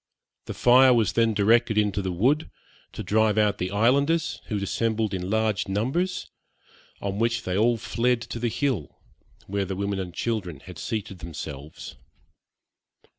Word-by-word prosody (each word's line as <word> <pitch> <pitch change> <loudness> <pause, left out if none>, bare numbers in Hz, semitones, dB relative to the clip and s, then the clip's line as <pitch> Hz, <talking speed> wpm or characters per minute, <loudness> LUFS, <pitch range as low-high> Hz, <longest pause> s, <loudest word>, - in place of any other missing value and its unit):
The - - -6
fire 125 +1 +6
was 110 -5 +2
then 115 -2 +2
directed 110 +2 +3
into 105 -1 +1
the 95 -1 -2
wood, 130 - +1 0.4
to - - -6
drive 110 0 +2
out 105 -1 +2
the 90 - -1
islanders, 140 - +1
who 110 - -3
had 100 - -2
assembled 110 0 -1
in 90 0 -3
large 110 -2 0
numbers, 135 - -1 0.8
on 100 0 -3
which 115 +1 +1
they 90 - -2
all 115 +3 +3
fled 120 +2 0
to 120 - -6
the 120 0 0
hill, 110 - -2 0.5
where 100 0 -1
the 95 0 -4
women 100 0 -2
and 90 -2 -4
children 95 - -3
had 90 -3 -11
seated 105 -5 -4
themselves. 75 -3 -8
110 Hz, 160 wpm, -25 LUFS, 95-120 Hz, 0.8 s, fire